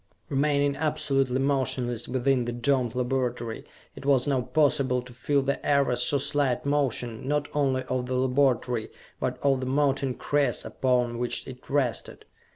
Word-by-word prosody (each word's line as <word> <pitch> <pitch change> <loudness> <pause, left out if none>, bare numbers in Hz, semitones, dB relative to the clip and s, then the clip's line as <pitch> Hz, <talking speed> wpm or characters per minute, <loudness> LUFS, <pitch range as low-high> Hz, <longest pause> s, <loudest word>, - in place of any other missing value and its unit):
Remaining 140 0 +2
absolutely 140 -4 0
motionless 130 -3 0
within 130 0 +1
the 120 - -2
domed 120 0 0
laboratory, 125 -2 -2 0.3
it - - -10
was 135 -2 +3
now 135 -3 +2
possible 135 -2 +2
to 125 -1 -13
feel 140 +4 0
the 140 +1 -2
ever 140 -3 +2
so 125 +4 +1
slight 140 -2 0
motion, 130 -5 -1
not 145 0 0
only 135 -3 +1
of 130 -1 -2
the 130 - -2
laboratory, 125 -3 +1 0.3
but - - -2
of 135 -2 +3
the 130 - -3
mountain 135 -1 +1
crest 145 -1 0
upon 125 -2 0
which 120 0 -1
it 125 -1 -11
rested. 135 -5 -1
130 Hz, 155 wpm, -27 LUFS, 125-140 Hz, 0.3 s, was